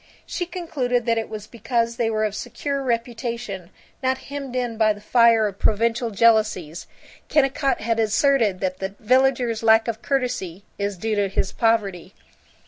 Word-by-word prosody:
She 355 - -4
concluded 285 -10 -2
that 230 -1 +2
it 225 - -5
was 215 -1 -7
because 235 +1 -2
they 230 -2 +1
were 215 -1 0
of 210 - -2
secure 280 +5 -3
reputation, 235 -6 -3 0.3
not 260 0 +1
hemmed 275 -2 -7
in 245 -2 -1
by 215 -1 +3
the 205 - -13
fire 230 0 +4
of 200 -2 -4
provincial 230 +2 +1
jealousies. 215 -7 +2 0.4
Kennicott 275 -1 +1
had 230 +1 0
asserted 220 -2 +2
that 185 -1 -2
the 195 +1 -4
villager's 255 -1 +2
lack 225 0 +5
of 225 -1 -3
courtesy 245 -9 -2 0.2
is 200 -1 -2
due 220 +4 -2
to 200 -1 +1
his 195 0 -1
poverty. 200 -5 0
230 Hz, 160 wpm, -23 LUFS, 210-250 Hz, 0.4 s, lack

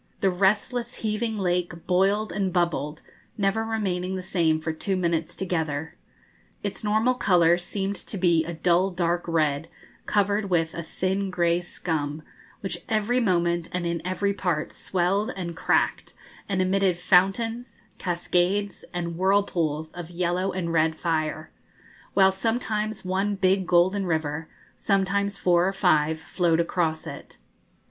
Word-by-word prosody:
The 195 - +3
restless, 210 +6 +1
heaving 220 +1 -1
lake 175 -3 -1
boiled 195 +3 +2
and 190 0 -1
bubbled, 170 -3 -1 0.3
never 205 +2 +1
remaining 190 -5 -2
the 185 - -4
same 165 -4 +1
for 160 0 -3
two 190 +4 -1
minutes 170 -3 -1
together. 160 -3 -2 0.7
Its - - -4
normal 220 +4 +2
colour 175 -7 +4
seemed 195 +2 -3
to 205 - -4
be 170 -3 +3
a 170 - -5
dull 175 +3 +2
dark 175 -1 0
red, 155 -2 +1 0.4
covered 205 0 +1
with 165 -3 +1
a 170 - -4
thin 190 +4 -2
grey 175 -1 +1
scum, 155 -4 -3 0.4
which 195 - -3
every 220 +3 +2
moment 175 -5 +1
and 180 -1 -2
in 170 -1 -1
every 195 +2 0
part 175 -6 -2
swelled 190 +3 0
and 170 -3 -4
cracked, - - 0 0.3
and 190 -2 +1
emitted 190 -1 +2
fountains, 225 +7 +1 0.2
cascades, 180 +3 0
and 170 -1 -3
whirlpools 170 -6 +1
of 175 -1 -8
yellow 180 +2 -1
and 170 -3 -3
red 160 0 +2
fire, 155 -1 -2 0.6
while 190 -1 +6
sometimes 215 0 -2
one 195 +2 0
big 190 -1 +2
golden 185 +3 +3
river, 160 -1 -2 0.3
sometimes 200 0 0
four 175 -1 +3
or 195 - -1
five, 160 -5 +2
flowed 170 0 +1
across 165 -2 0
it. - - -9
180 Hz, 140 wpm, -25 LUFS, 170-195 Hz, 0.7 s, while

